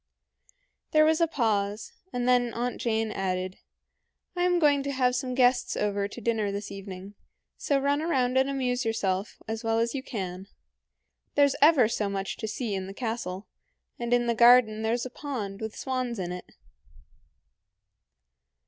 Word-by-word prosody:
There 310 0 +6
was 315 +1 +3
a 335 - +4
pause, 210 -7 -1 0.2
and 245 0 -2
then 245 -1 +3
Aunt 245 +1 -2
Jane 225 -2 0
added, 185 -1 -3 0.8
"I 355 - -1
am 355 0 +3
going 290 -4 +4
to 280 0 -3
have 250 -2 +1
some 255 -1 -2
guests 250 -1 +3
to 200 -1 -1
dinner 220 -1 -1
this 200 +1 -5
evening, 195 0 -8 0.4
so 285 - 0
run 280 +1 +1
round 260 -6 +1
and 265 +1 +3
amuse 255 -2 -1
yourself 200 -3 -1
as 225 +1 -4
well 225 0 +1
as 230 +1 +1
you 275 - -3
can. 190 -7 -5 0.9
There's 285 -1 +4
ever 290 -6 +6
so 215 -2 -1
much 195 0 -3
to 220 - -4
see 220 0 -3
in 190 -1 -3
the 195 - -9
castle, 220 -5 -4 0.5
and 235 0 -3
in 245 0 +3
the 235 - +1
garden 235 -2 +6
there's 230 +3 0
a 255 - -6
pond 225 -9 -5
with 220 0 -5
swans 255 -3 -2
in 180 -2 -3
it." 180 0 -8
235 Hz, 165 wpm, -27 LUFS, 205-255 Hz, 0.9 s, There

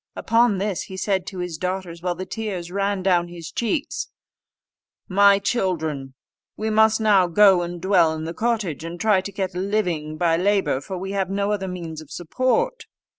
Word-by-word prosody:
Upon 230 -2 +2
this 200 -1 -2
he 190 - -9
said 190 -1 -1
to 190 - -6
his 180 -3 -4
daughters, 180 -2 -4
while 175 0 -1
the 185 - -5
tears 190 -6 -5
ran 200 0 -1
down 175 -2 +2
his 170 -2 -9
cheeks, 280 +6 -2 1.0
"My 200 +1 +5
children, 160 - -2 0.4
we 220 +1 -2
must 220 +1 +4
now 205 -4 +4
go 190 0 +5
and 175 0 -5
dwell 175 -3 +3
in 155 - -5
the 165 +1 -4
cottage, 210 - -1
and 170 +1 -6
try 210 -4 +3
to 200 - -7
get 190 -2 -3
a 180 - -4
living 180 -6 -1
by 165 0 +2
labour, 195 -7 +1
for 190 +5 -6
we 190 +2 -5
have 195 -2 -1
no 200 +1 0
other 195 -2 -2
means 170 -4 -6
of 155 - -14
support." 260 - -1
190 Hz, 185 wpm, -23 LUFS, 170-205 Hz, 1.0 s, My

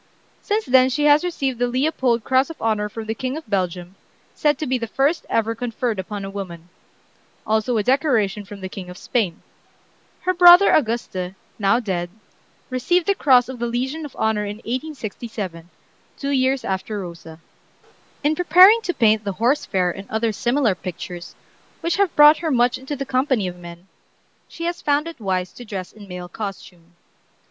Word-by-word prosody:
Since 425 +1 -1
then 255 0 +5
she 295 +3 -1
has 295 +2 +5
received 275 -8 -2
the 245 - +2
Leopold 255 -3 0
Cross 260 +4 +2
of 330 - -9
Honor 215 -2 0
from 220 +1 -7
the 220 - -2
King 260 +5 -4
of 315 - -9
Belgium, 180 -3 -2 0.4
said 295 -2 +1
to 310 - -3
be 255 -2 0
the 230 - -4
first 275 +8 0
ever 225 0 +1
conferred 230 -2 -3
upon 200 +1 -5
a - - -5
woman; 175 -4 -7 0.8
also 220 +2 +1
a 210 - +1
decoration 235 -6 +1
from 200 0 -11
the 190 - -4
King 185 -1 -8
of 180 - -10
Spain. 200 -9 -2 0.8
Her 370 - 0
brother 355 +2 +8
Auguste, 215 -8 -1 0.2
now 210 +3 +3
dead, 180 -6 -3 0.6
received 330 +8 +1
the 400 - +3
Cross 255 -9 +4
of 260 -2 -8
the 240 - -1
Legion 260 +7 -3
of 290 - -9
Honor 220 -1 0
in 205 0 -4
1867, 225 - -5 0.5
two 280 0 -3
years 265 -1 +1
after 195 +2 -3
Rosa. 170 -3 -9 0.8
In 295 +2 +3
preparing 370 +6 +7
to 355 -5 -3
paint 220 -2 +3
the 200 -1 -3
"Horse 240 +9 +1
Fair" 180 -2 +1
and 195 +3 -10
other 220 +1 0
similar 240 +1 +1
pictures, 180 -1 -8 0.5
which 335 +2 0
have 400 -4 +1
brought 295 +1 +8
her 330 - -2
much 245 -3 +2
into 265 +3 -5
the 275 0 -4
company 255 -6 0
of 180 - -6
men, 170 0 -11 0.6
she 335 - -7
has 345 0 -3
found 290 +2 +1
it 335 -5 -9
wise 185 -3 -2
to 245 - -10
dress 195 -5 -6
in 210 -2 -13
male 180 -1 -7
costume. 180 -3 -8
235 Hz, 180 wpm, -21 LUFS, 195-275 Hz, 0.8 s, brother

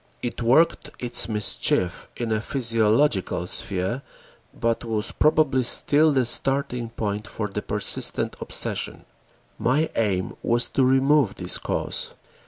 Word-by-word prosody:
It 120 0 -4
worked 130 +8 +2
its 120 -1 +1
mischief 105 -4 0
in 120 -2 -3
a 110 -1 0
physiological 115 -6 +1
sphere 95 +6 -1 0.5
but 115 0 -2
was 110 -1 -2
probably 150 -3 +2
still 145 +5 +4
the 130 -3 +1
starting 130 -1 0
point 105 -2 -4
for 105 - -4
the 100 - -5
persistent - - 0
obsession. - - -1 0.5
My 150 +6 +1
aim 95 -5 -1
was 120 +1 0
to 135 - +1
remove 135 -3 +3
this 90 0 +2
cause. - - -3
120 Hz, 125 wpm, -23 LUFS, 105-135 Hz, 0.5 s, still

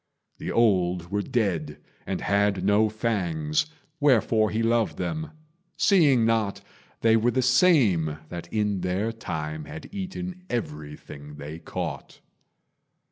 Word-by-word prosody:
The - - -4
old 90 -6 +2
were 105 0 0
dead 95 - -1 0.3
and - - -2
had 100 0 +1
no 105 +2 +4
fangs, 90 - -1 0.3
Wherefore 115 -6 +3
he 110 +1 -1
loved 115 -1 +1
them 155 - -3 0.5
seeing 145 - +4
not 110 -3 +1 0.4
They 115 -1 +5
were 115 +2 +3
the 130 +1 +1
same 120 - +4
that 85 0 -7
in 105 -3 0
their 95 +5 -1
time 80 -8 -5
Had 80 - -10
eaten 185 -2 -5
everything 75 -6 -6
they 75 +3 -8
caught. 85 - -6
105 Hz, 125 wpm, -26 LUFS, 85-120 Hz, 0.5 s, They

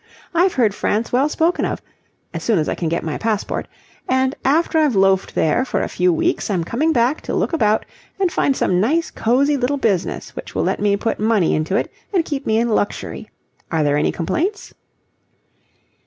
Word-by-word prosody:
I've 355 +2 +3
heard 225 -6 +3
France 215 +3 -1
well 270 +4 +2
spoken 330 +3 +1
of - - -2 0.5
as - - -4
soon 225 -4 +2
as 155 - 0
I - - 0
can 165 - -2
get 170 - -1
my 155 -2 -3
passport; 220 -3 -2 0.4
and 260 +1 +2
after 320 +4 +2
I've 295 -7 +2
loafed 195 0 +2
there 160 +11 +2
for 265 - -1
a - - -1
few 180 0 +1
weeks, 165 - 0
I'm 185 -5 0
coming 285 - 0
back 250 +1 +1
to - - -4
look - - 0
about 215 -9 +2 0.3
and 375 -3 +2
find 275 -4 +1
some 180 - +1
nice 320 +10 +1
cosy 275 +6 +2
little 265 +2 0
business 200 -9 -1
which - - -8
will - - +1
let - - 0
me 200 -1 +2
put 225 - -2
money 215 -5 +2
into 155 +5 -1
it 225 - -1 0.2
and 360 -5 +1
keep 285 -3 -4
me 220 - +2
in 235 +1 +1
luxury. 210 -2 -2 0.4
Are 160 -2 +1
there 145 -1 +2
any 150 - +1
complaints?" 350 - -2
230 Hz, 200 wpm, -20 LUFS, 195-285 Hz, 0.5 s, I've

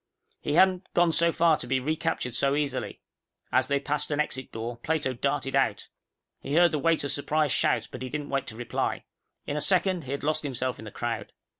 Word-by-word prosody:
He 145 - -2
hadn't 185 +1 +3
gone 175 -1 +4
so 170 +2 +3
far 165 -2 +4
to - - -5
be 130 +1 +1
recaptured 130 -3 -2
so 140 +3 +2
easily. 140 -4 -2 0.5
As 130 +1 +3
they 140 0 +1
passed 150 +1 -1
an 150 -1 -1
exit 130 -3 -2
door, 115 +1 -5
Plato 150 +1 -1
darted 140 +2 -1
out. 135 -1 +1 0.5
He 140 - -3
heard 175 0 +6
the 155 - 0
waiter's 155 -2 +2
surprised 150 0 +1
shout, - - +1
but - - -8
he 130 - -4
didn't 150 +1 -4
wait 135 -1 -1
to 110 - -7
reply. 120 - -2 0.4
In 145 - -3
a - - -1
second, 185 -1 +2
he 130 - -6
had 140 - -3
lost 155 +1 +1
himself 130 -3 -3
in 110 - -9
the - - -6
crowd. 120 -1 -4
145 Hz, 210 wpm, -27 LUFS, 130-155 Hz, 0.5 s, heard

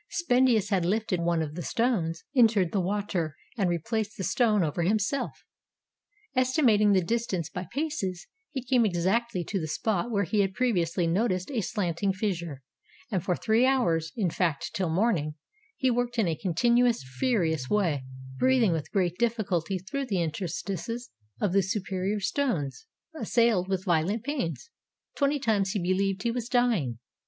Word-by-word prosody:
Spendius 250 - +2
had 190 -4 +2
lifted 195 -1 0
one 170 -1 +1
of 150 -1 -5
the 175 - -5
stones, 175 -7 0
entered 220 -8 +4
the 195 - +1
water, 180 -5 -2 0.2
and 195 -6 +1
replaced 210 +6 -2
the 190 - -3
stone 215 -2 +2
over 160 +2 -1
himself. 210 +8 0 0.9
Estimating 250 -6 +4
the 185 -2 +3
distance 190 -6 -1
by 180 -1 -5
paces, 235 - -3 0.3
he 265 -3 -4
came 245 -1 +3
exactly 195 +2 0
to 195 +4 -2
the 155 - -3
spot 200 +6 -1
where 200 -3 +1
he 205 +4 0
had 195 -1 +1
previously 180 -9 +1
noticed 185 +3 0
a 240 -5 0
slanting 190 -1 -1
fissure, 170 -8 -3 0.5
and 185 -5 0
for 180 - +1
three 220 +5 +2
hours 165 -12 +1
— - - -38
in 190 -7 +1
fact, 165 -6 -1
till 185 -4 -1
morning 160 -5 +1 0.2
— 440 +1 -36
he 260 -1 +2
worked 245 0 -1
in 220 -5 +2
a 165 - 0
continuous, 235 - +2
furious 160 - 0
way, 170 -10 +1 0.4
breathing 255 -6 +4
with 160 -3 -3
great 180 -2 0
difficulty 200 -7 0
through 255 +10 -4
the 195 -6 0
interstices 190 +7 -3 0.3
of 195 -4 0
the 195 - +5
superior 195 +1 -2
stones; 235 - -1 0.3
assailed 230 - +2
with 190 -1 -2
violent 180 +5 +1
pains, 270 - -3 0.4
twenty 285 0 +2
times 215 -7 +1
he 205 - 0
be 180 +1 +1
heved 195 0 0
he 235 - +1
was 240 0 -4
dying. 225 - +1
195 Hz, 165 wpm, -28 LUFS, 175-235 Hz, 0.9 s, the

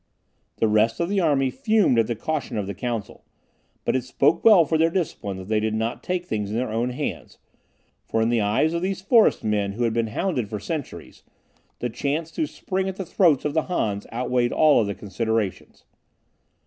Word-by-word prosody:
The 110 - +1
rest 110 +2 +2
of 170 +1 0
the 200 0 +1
army 140 -6 +2
fumed 215 - +2
at 115 - +2
the 120 - -2
caution 150 +1 -3
of 105 - -1
the 100 - -5
council, 115 +1 -5 0.6
but - - +1
it 130 - 0
spoke 140 +4 +1
well 205 -7 +7
for 160 - -1
their 160 +1 +3
discipline 150 - -3
that 95 0 -9
they 110 0 +1
did 110 0 -1
not 110 +2 -2
take 180 -1 -2
things 105 - -3
in 110 - -2
their 125 -2 -2
own 115 +3 0
hands, 125 - -5 0.7
for 115 - 0
in 110 +1 +2
the 120 -2 +2
eyes 105 +10 +1
of 170 - -1
those 190 +1 -2
forest 220 +3 +4
men 105 -2 0
who 120 +4 -2
had 115 -1 +1
been 115 0 0
hounded 125 - -2
for 105 -1 -4
centuries, 155 - -6 0.6
the 120 - -3
chance 150 +7 -2
to 315 - -2
spring 190 -6 -3
at 190 - -5
the 190 - -5
throats 160 -6 +3
of 150 - -1
the 160 -1 +1
Hans 105 - -2
outweighed 125 +1 0
all 150 -5 +5
other 100 -2 -2
considerations. 105 +1 -3
125 Hz, 205 wpm, -24 LUFS, 110-165 Hz, 0.7 s, well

